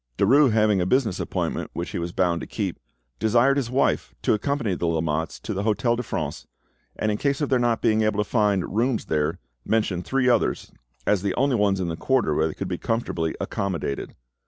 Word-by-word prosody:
Derues 135 Hz, +6 st, +5 dB
having 105 Hz, -3 st, +3 dB
a 90 Hz, -, 0 dB
business 115 Hz, -5 st, +1 dB
appointment -, -, -2 dB
which 85 Hz, -, -4 dB
he -, -, -3 dB
was 85 Hz, 0 st, -3 dB
bound 85 Hz, -1 st, +1 dB
to -, -, -6 dB
keep, 100 Hz, -5 st, -3 dB, 0.4 s
desired 120 Hz, +5 st, +3 dB
his 135 Hz, -5 st, -1 dB
wife 130 Hz, +2 st, 0 dB
to -, -, +3 dB
accompany 115 Hz, -1 st, -1 dB
the 85 Hz, -1 st, -2 dB
Lamottes 80 Hz, 0 st, -1 dB
to 105 Hz, -, -5 dB
the 100 Hz, -, -2 dB
Hotel 110 Hz, +3 st, +1 dB
de 120 Hz, -, -2 dB
France, 80 Hz, -9 st, -4 dB, 0.5 s
and 110 Hz, -, 0 dB
in 105 Hz, -, -2 dB
case 140 Hz, -1 st, 0 dB
of 145 Hz, -, -1 dB
their 130 Hz, -, +3 dB
not 120 Hz, -2 st, +1 dB
being 110 Hz, -1 st, +3 dB
able 110 Hz, -1 st, +1 dB
to 105 Hz, 0 st, 0 dB
find 105 Hz, -5 st, +1 dB
rooms 120 Hz, +1 st, +1 dB
there, 75 Hz, +2 st, 0 dB, 0.3 s
mentioned 105 Hz, -5 st, 0 dB
three 135 Hz, +3 st, 0 dB
others 125 Hz, -, +1 dB, 0.3 s
as 105 Hz, -3 st, +2 dB
the 100 Hz, -1 st, -1 dB
only 135 Hz, -1 st, +2 dB
ones 100 Hz, -3 st, +2 dB
in 90 Hz, -, -1 dB
the 80 Hz, -, -2 dB
quarter 125 Hz, -, +1 dB
where 80 Hz, +2 st, +2 dB
they 80 Hz, -, -6 dB
could -, -, -4 dB
be -, -, -3 dB
comfortably 85 Hz, -8 st, -1 dB
accommodated. 85 Hz, -8 st, -3 dB
105 Hz, 210 wpm, -24 LUFS, 90-120 Hz, 0.5 s, Derues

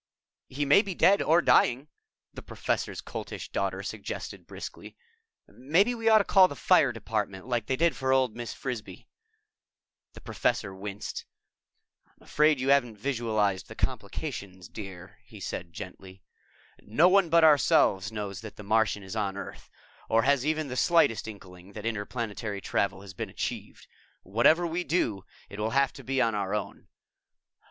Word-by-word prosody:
_" -, -, -13 dB
"He 145 Hz, +1 st, 0 dB
may 145 Hz, +8 st, +6 dB
be 195 Hz, -4 st, -6 dB
dead 200 Hz, +4 st, +4 dB
or 165 Hz, +2 st, +3 dB
dying," 130 Hz, +5 st, +3 dB, 0.5 s
the -, -, -8 dB
Professor's -, -, -3 dB
Coltish -, -, -7 dB
Daughter -, -, -2 dB
suggested -, -, -6 dB
briskly. -, -, -9 dB, 0.5 s
"Maybe 165 Hz, -, +1 dB
we 225 Hz, -1 st, +1 dB
ought 220 Hz, -, +7 dB
to 210 Hz, -, +4 dB
call 190 Hz, -1 st, +6 dB
the -, -, -8 dB
Fire 165 Hz, -8 st, +4 dB
Department, 105 Hz, -4 st, -4 dB
like 120 Hz, -3 st, -2 dB
they 130 Hz, -, +1 dB
did 165 Hz, +4 st, +2 dB
for 130 Hz, 0 st, -1 dB
old 130 Hz, -4 st, +2 dB
Mrs. 120 Hz, 0 st, -6 dB
Frisbee." 110 Hz, -8 st, -6 dB, 1.1 s
The -, -, -13 dB
Professor 95 Hz, -, -1 dB
winced. 100 Hz, +1 st, -6 dB, 0.8 s
"I'm -, -, -26 dB
afraid 150 Hz, -2 st, +3 dB
you 130 Hz, +1 st, -1 dB
haven't 120 Hz, -6 st, +3 dB
visualized 110 Hz, -5 st, -1 dB
the -, -, -10 dB
complications, 95 Hz, -2 st, -4 dB
dear," 95 Hz, -4 st, -10 dB
he -, -, -14 dB
said 85 Hz, -1 st, -5 dB
gently. 95 Hz, 0 st, -10 dB, 0.6 s
"No 145 Hz, +12 st, +3 dB
one 190 Hz, -2 st, +4 dB
but 165 Hz, 0 st, +5 dB
ourselves 115 Hz, -, +4 dB
knows 100 Hz, -3 st, -5 dB
that 110 Hz, -2 st, -9 dB
the 105 Hz, -, -10 dB
Martian 105 Hz, -1 st, +1 dB
is 95 Hz, +3 st, -8 dB
on 100 Hz, -3 st, -2 dB
Earth, -, -, -9 dB, 0.4 s
or 115 Hz, 0 st, +3 dB
has 140 Hz, -1 st, +3 dB
even 155 Hz, 0 st, -1 dB
the 125 Hz, -, -5 dB
slightest 165 Hz, -8 st, +3 dB
inkling 95 Hz, -3 st, -12 dB
that 105 Hz, +1 st, -8 dB
interplanetary 110 Hz, -1 st, -3 dB
travel 95 Hz, 0 st, -1 dB
has 100 Hz, -1 st, -11 dB
been -, -, -5 dB
achieved. -, -, -5 dB, 0.4 s
Whatever 120 Hz, -, +3 dB
we 170 Hz, +2 st, -2 dB
do, 115 Hz, -, -1 dB, 0.2 s
it 100 Hz, -, -10 dB
will 110 Hz, +1 st, 0 dB
have 140 Hz, -1 st, +3 dB
to -, -, -11 dB
be 135 Hz, 0 st, -1 dB
on 115 Hz, -3 st, +2 dB
our 100 Hz, -1 st, -1 dB
own. 105 Hz, -, -5 dB
115 Hz, 165 wpm, -28 LUFS, 100-145 Hz, 1.1 s, ought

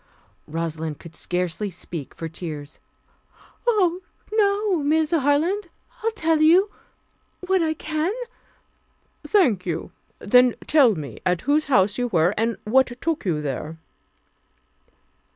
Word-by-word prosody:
Rosalind 160 Hz, -1 st, -4 dB
could 165 Hz, -1 st, -13 dB
scarcely 180 Hz, +3 st, -2 dB
speak 170 Hz, -4 st, -8 dB
for 165 Hz, -, -5 dB
tears. 155 Hz, -3 st, -7 dB, 0.9 s
"Oh, 370 Hz, -6 st, +2 dB, 0.3 s
no, 410 Hz, -2 st, +2 dB
Miss 310 Hz, +1 st, +1 dB
Harland. 330 Hz, +6 st, +1 dB, 0.3 s
I'll 450 Hz, -, +1 dB
tell 325 Hz, -6 st, +1 dB
you 360 Hz, +6 st, +5 dB, 0.7 s
what 375 Hz, 0 st, +1 dB
I 315 Hz, -1 st, 0 dB
can 310 Hz, +3 st, -2 dB, 0.6 s
" -, -, -42 dB
"Thank 235 Hz, -, +3 dB
you. 170 Hz, +1 st, -3 dB, 0.3 s
Then 250 Hz, +3 st, +4 dB
tell 270 Hz, -8 st, +5 dB
me 150 Hz, -4 st, -7 dB
at 180 Hz, -2 st, +1 dB
whose 295 Hz, +3 st, +2 dB
house 205 Hz, -5 st, +2 dB
you 245 Hz, -, +1 dB
were, 175 Hz, -3 st, +2 dB
and 225 Hz, -1 st, 0 dB
what 260 Hz, +5 st, +4 dB
took 325 Hz, -6 st, -2 dB
you 155 Hz, -5 st, 0 dB
there?" 150 Hz, +3 st, -4 dB
250 Hz, 125 wpm, -23 LUFS, -, 0.9 s, you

